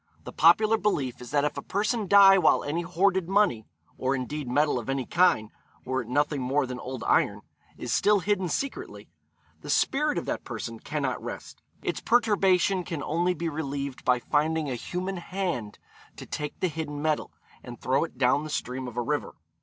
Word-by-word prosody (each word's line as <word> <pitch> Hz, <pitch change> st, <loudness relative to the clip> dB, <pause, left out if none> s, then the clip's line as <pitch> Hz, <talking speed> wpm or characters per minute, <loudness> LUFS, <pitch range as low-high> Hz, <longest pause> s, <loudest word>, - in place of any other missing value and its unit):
The -, -, -9 dB
popular 215 Hz, +7 st, +5 dB
belief 140 Hz, -, -1 dB
is 125 Hz, -, -9 dB
that 145 Hz, 0 st, +1 dB
if 150 Hz, -, -2 dB
a -, -, -3 dB
person 210 Hz, -, -1 dB
die 195 Hz, 0 st, +8 dB
while -, -, +4 dB
any 155 Hz, +4 st, -2 dB
hoarded 185 Hz, +1 st, +1 dB
money 195 Hz, -, +2 dB, 0.3 s
or 130 Hz, +1 st, +1 dB
indeed 135 Hz, +2 st, -4 dB
metal 145 Hz, +1 st, +2 dB
of 120 Hz, -, -8 dB
any 135 Hz, -1 st, -1 dB
kind, 165 Hz, -12 st, +2 dB, 0.3 s
were 130 Hz, +1 st, -1 dB
it 115 Hz, -, -10 dB
nothing 145 Hz, +2 st, 0 dB
more 135 Hz, +3 st, +1 dB
than 125 Hz, -1 st, -6 dB
old 125 Hz, -2 st, -6 dB
iron -, -, +2 dB, 0.4 s
is -, -, -3 dB
still 205 Hz, 0 st, +4 dB
hidden 190 Hz, -2 st, 0 dB
secretly, 275 Hz, -, -4 dB, 0.5 s
the -, -, -10 dB
spirit 300 Hz, +2 st, +1 dB
of -, -, -2 dB
that -, -, -3 dB
person -, -, -6 dB
cannot -, -, -3 dB
rest. -, -, -8 dB, 0.2 s
Its -, -, -2 dB
perturbation 195 Hz, -5 st, +3 dB
can 165 Hz, -5 st, -5 dB
only 175 Hz, +5 st, 0 dB
be 170 Hz, +1 st, -3 dB
relieved 140 Hz, -3 st, -4 dB
by 125 Hz, -1 st, +3 dB
finding 150 Hz, +3 st, 0 dB
a -, -, -1 dB
human 180 Hz, +9 st, -4 dB
hand 175 Hz, -, -4 dB, 0.4 s
to -, -, -9 dB
take 150 Hz, -1 st, -5 dB
the 185 Hz, -, +2 dB
hidden 155 Hz, -3 st, -5 dB
metal, 155 Hz, 0 st, -1 dB, 0.3 s
and 120 Hz, -1 st, -10 dB
throw 135 Hz, +4 st, +1 dB
it 165 Hz, -, -7 dB
down 130 Hz, +3 st, +2 dB
the 155 Hz, -, -6 dB
stream 130 Hz, -3 st, -3 dB
of 120 Hz, -1 st, -9 dB
a 120 Hz, -, 0 dB
river. 145 Hz, +4 st, -2 dB
150 Hz, 190 wpm, -27 LUFS, 130-185 Hz, 0.5 s, die